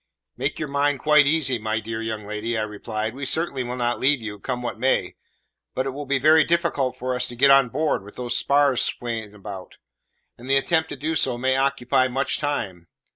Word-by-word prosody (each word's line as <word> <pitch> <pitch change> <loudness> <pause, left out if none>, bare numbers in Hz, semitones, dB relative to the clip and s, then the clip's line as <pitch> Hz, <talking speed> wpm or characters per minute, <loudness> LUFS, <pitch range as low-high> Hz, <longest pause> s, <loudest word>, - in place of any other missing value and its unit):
"Make - - -2
your 155 - -3
mind 140 0 +1
quite 150 0 +5
easy, 140 -5 +1
my 110 0 -1
dear 110 +1 -5
young 110 -2 -4
lady," 105 +2 -3
I 110 - 0
replied; 110 +1 -4
"we 135 +2 -8
certainly 135 -1 0
will 120 +1 -4
not 120 -1 -1
leave 140 +1 +3
you, 105 -2 -7
come 125 +2 -4
what 120 - -4
may. 130 +2 +1 0.6
But 130 - -1
it 135 - -2
will 145 +1 -7
be 140 +1 +2
very 155 +4 +5
difficult 165 -6 0
for 130 +1 -2
us 125 0 0
to 120 - -8
get 140 +3 +5
on 135 -2 +6
board, 150 -4 -1
with 105 - -13
those 120 -1 -3
spars 140 -2 +3
swaying 110 -3 -3
about; 100 -2 -9 0.6
and 125 +2 -10
the 135 - +5
attempt 160 +3 +1
to - - -5
do 155 +4 -3
so 135 -5 +1
may 130 +2 +1
occupy 135 -1 +1
much 135 +2 -1
time. 95 - -3
130 Hz, 215 wpm, -23 LUFS, 115-140 Hz, 0.6 s, on